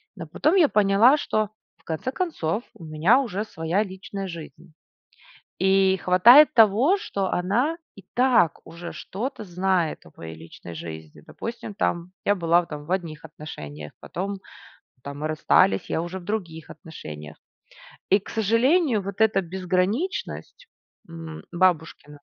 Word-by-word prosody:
Но 170 -4 -8
потом 305 - +1
я 340 -6 +6
поняла, 210 +7 +5
что 215 -6 -1 0.3
в 165 - -31
конце 165 +10 -3
концов, 250 - -2
у - - -14
меня 160 - +3
уже 210 -6 -2
своя 170 +2 -1
личная 195 0 -7
жизнь. 165 -2 -10 0.9
И 190 0 +3
хватает 240 +14 +7
того, 230 - +5
что 200 - -3
она 235 - 0 0.2
и 195 - -14
так 245 - +3
уже 170 +1 -9
что-то 235 +5 -5
знает 180 -3 -1
о 80 - -16
моей 80 -1 -9
личной 85 +1 -11
жизни. 80 -1 -9
Допустим, 230 -3 -7
там 175 -2 -1
я 205 - +3
была 170 -1 +3
в - - -15
там 150 -1 -8
в 175 - -8
одних 165 -5 -3
отношениях. 75 - -9
Потом 195 +3 -5 0.7
там 140 +1 -7
мы 155 - -2
расстались, 95 -10 +2
я 160 - 0
уже 175 +2 -5
в 180 - -13
других 175 -6 -5
отношениях. 75 - -10 0.7
И 195 - +6
к 200 - -15
сожалению, 230 - +2
вот 200 +2 -7
эта 215 -3 +4
безграничность, 190 - -2 0.4
м 165 -1 -9
бабушкина 170 -4 +1
185 Hz, 145 wpm, -24 LUFS, 160-220 Hz, 0.9 s, хватает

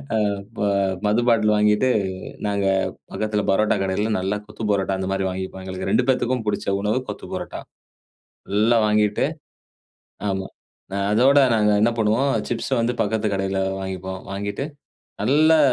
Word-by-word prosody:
அ - - +3 0.3
இப்ப 115 +1 -9 0.5
மது 110 +3 +3
பாட்டில் 110 -2 +4
வாங்கிட்டு 105 +4 +3 0.6
நாங்க 100 -1 0 0.5
பக்கத்தில 105 -1 -1
பரோட்டா 105 +2 +3
கடையில 100 +3 0
நல்லா 95 +3 -1
கொத்து 105 +1 -9
பரோட்டா 95 -1 0
அந்த 95 - -2
மாதிரி 95 0 0
வாங்கிப்போம். 95 0 -5
எங்களுக்கு 95 0 -4
2 120 +3 +3
பேத்துக்கும் 125 -1 +1
பிடிச்ச 100 -1 -1
உணவு 105 +4 +1
கொத்து - - -7
பரோட்டா. - - -5 0.9
ஃபுல்லா 110 +4 +3
வாங்கிட்டு 105 -1 +2 1.1
ஆமா. 95 0 -3 0.5
அ - - -1 0.2
அதோட 135 +6 +5 0.2
நாங்க 105 -1 +3
என்ன 115 - +4
பண்ணுவோம், 115 +6 +2 0.2
சிப்ஸ 120 +2 -2
வந்து 120 +2 0
பக்கத்து 110 +1 -1
கடையில 95 0 -1 0.2
வாங்கிப்போம். 95 0 -5
வாங்கிட்டு 100 +7 -3 0.6
நல்லா 155 +4 +4
105 Hz, 140 wpm, -22 LUFS, 95-115 Hz, 1.1 s, அதோட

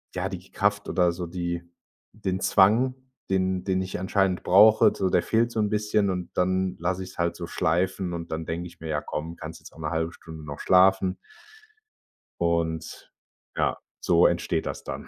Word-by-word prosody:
ja, 95 +1 -1
die 95 0 -8
Kraft 100 0 0
oder 90 -2 +3
so 85 0 -5
die 85 0 -3 0.5
den 95 -3 -3
Zwang, 115 +9 +4 0.3
den 95 -1 0
den 95 -1 0
ich 95 -1 -4
anscheinend 95 -1 0
brauche, 105 +4 +6
so, 95 -1 0
der - - +3
fehlt 115 +1 +1
so 110 - -3
'n 105 -1 +1
bisschen, 105 -1 +1
und 90 -1 -3
dann 95 0 +1
lasse 90 +2 -1
ich's 95 - -11
halt 85 0 0
so - - -6
schleifen 90 +2 0
und 85 -1 -6
dann 80 0 -3
denke 85 +2 -4
ich 85 0 -17
mir: 80 0 -7
„Ja 75 -1 -1
komm, 80 +2 -5
kannst 80 +1 -8
jetzt - - -14
auch 80 - -16
'ne 75 -1 -3
1/2 80 +1 -1
Stunde 80 -3 -11
noch 70 -1 -7
schlafen.“ 95 0 +4 1.3
Und 85 -1 -2 0.5
ja, - - +1 0.2
so - - +5
entsteht - - -1
das - - -5
dann. - - -6
90 Hz, 185 wpm, -26 LUFS, 85-95 Hz, 1.3 s, brauche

